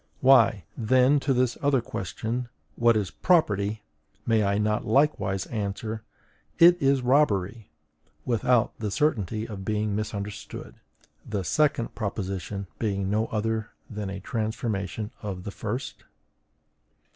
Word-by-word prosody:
Why, 125 - +5
then, 130 +5 +4
to 140 - -1
this 125 -2 +1
other 140 -2 +3
question: 115 +3 -4 0.3
WHAT 115 -1 +4
IS 100 -4 -2
PROPERTY! 105 - +1 0.4
may 110 -2 +3
I 100 0 +1
not 105 0 +1
likewise 110 -7 +1
answer, 110 0 -4 0.6
IT 175 0 +7
IS 135 -1 +3
ROBBERY, 115 -6 +2 0.6
without 125 0 +2
the 110 -2 -2
certainty 110 - 0
of 100 -3 -7
being 105 0 -1
misunderstood; 105 -1 -5 0.5
the 100 -3 -3
second 140 - +1
proposition 100 -2 -4
being 100 -3 -1
no 110 +2 +1
other 110 0 -2 0.2
than 105 -2 -4
a 95 0 -5
transformation 110 -1 -3
of 95 -4 -5
the 100 - -5
first? 115 +6 -5
110 Hz, 120 wpm, -26 LUFS, 100-125 Hz, 0.6 s, IT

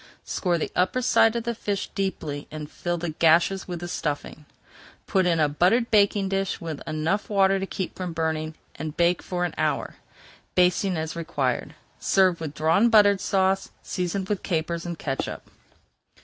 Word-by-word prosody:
Score 175 -3 0
the 160 - -3
upper 185 +8 +2
side 225 -1 +4
of 235 - -1
the 235 0 -1
fish 205 -3 -3
deeply 160 -7 -3
and 150 -1 -7
fill 175 0 -2
the 170 -1 -3
gashes 170 +5 +3
with 175 -2 -5
the 175 - -4
stuffing. 150 -2 -4 0.6
Put 190 -2 +2
in 165 -2 +2
a 155 - +4
buttered 185 +11 +2
baking 200 -2 +3
pan 195 0 +1
with 160 -3 -6
enough 155 +6 -1
water 195 -1 +3
to 195 - -3
keep 190 -2 -4
from 180 -2 -4
burning, 160 -1 -2 0.2
and 155 -1 -6
bake 175 0 +3
for 180 -1 -2
an 175 - -4
hour, - - -1 0.6
basting 180 0 +3
as 160 +1 -3
required. 140 -6 -2 0.2
Serve 185 -3 +3
with 150 -2 -5
Drawn 165 +9 +3
Butter 205 -3 +6
Sauce, 190 0 +1
seasoned 185 +1 -2
with 205 -1 -1
capers 170 0 -2
and 170 -1 -4
catsup. 135 -3 -4
175 Hz, 170 wpm, -25 LUFS, 160-195 Hz, 0.6 s, Butter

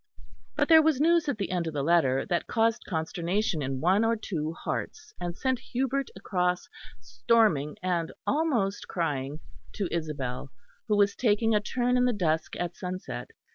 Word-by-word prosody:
But - - +2
there 320 -1 +8
was 310 -4 +2
news 330 0 +3
at 270 - -1
the 200 -3 -3
end 175 -2 -1
of 160 - -4
the 140 - 0
letter 140 -5 +3
that 175 -2 -1
caused 225 -1 +1
consternation 170 +2 -1
in 135 -1 -3
one 190 +6 +3
or 230 0 +2
two 160 -8 -3
hearts, 345 - -5
and 175 0 -4
sent 260 -2 0
Hubert 265 +2 -2
across, 180 -2 -1 0.3
storming 145 - +2
and 175 -3 0
almost 255 -11 0
crying, 150 -4 -2 0.3
to 200 - -2
Isabel, 145 -6 -3 0.4
who 210 -2 +2
was 200 -1 +3
taking 225 -1 +2
a 210 - +4
turn 250 +3 0
in 250 - +3
the 250 - +2
dusk 160 -6 0
at 175 0 -3
sunset. 185 0 -5
185 Hz, 170 wpm, -28 LUFS, 160-230 Hz, 0.4 s, there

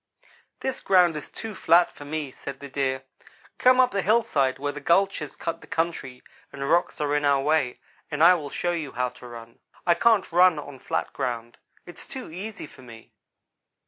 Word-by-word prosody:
"'This 265 -1 -3
ground 180 -4 +4
is 150 - -7
too 225 -1 -7
flat 175 -2 +4
for 145 - -12
me,' 150 -2 -4
said 135 +1 -8
the 140 - -8
Deer. 130 -1 -2 0.6
'Come 255 0 +5
up 255 -1 +5
the 200 - 0
hillside 190 - +2
where 145 +1 -2
the 145 - -7
gulches 170 -1 +1
cut 165 0 -4
the - - -14
country, 160 -6 -3 0.3
and 140 0 -5
rocks 170 +2 +1
are 145 -1 0
in 145 - +1
our 140 -1 +3
way, 150 -4 +1 0.3
and 150 0 0
I 175 +2 +9
will 155 -5 -3
show 175 +5 -2
you 160 -5 -4
how 125 +1 -1
to 125 - -13
run. 115 -1 -11 0.3
I 175 - +5
can't 210 +2 +3
run 180 -1 +5
on 145 -2 -8
flat - - -3
ground. 120 -3 -4 0.3
It's 175 - -12
too 260 - -8
easy 195 +4 -7
for 145 - -16
me.' 115 -3 -14
150 Hz, 195 wpm, -25 LUFS, 135-180 Hz, 0.6 s, I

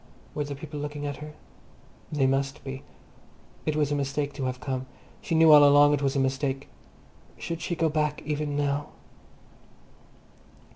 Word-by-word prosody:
Were 150 - -1
the 145 0 -5
people 150 +1 -7
looking 145 0 -5
at 145 -1 -4
her? 150 0 -9 0.8
They 145 -3 +2
must 135 +2 0
be. 135 0 -6 0.9
It 155 - +1
was 150 -1 +1
a - - +2
mistake 140 +1 -2
to 135 - -4
have 130 0 -3
come; 130 -1 -4 0.3
she 175 -6 -2
knew 160 0 +7
all 150 -1 +9
along 145 +1 +7
it 145 - 0
was 135 -1 0
a - - +2
mistake. 135 +1 -1 0.7
Should 165 -1 -5
she 170 +2 -2
go 165 0 +1
back 150 -1 -1
even 150 -1 -2
now? 145 0 0
145 Hz, 165 wpm, -27 LUFS, 135-150 Hz, 0.9 s, all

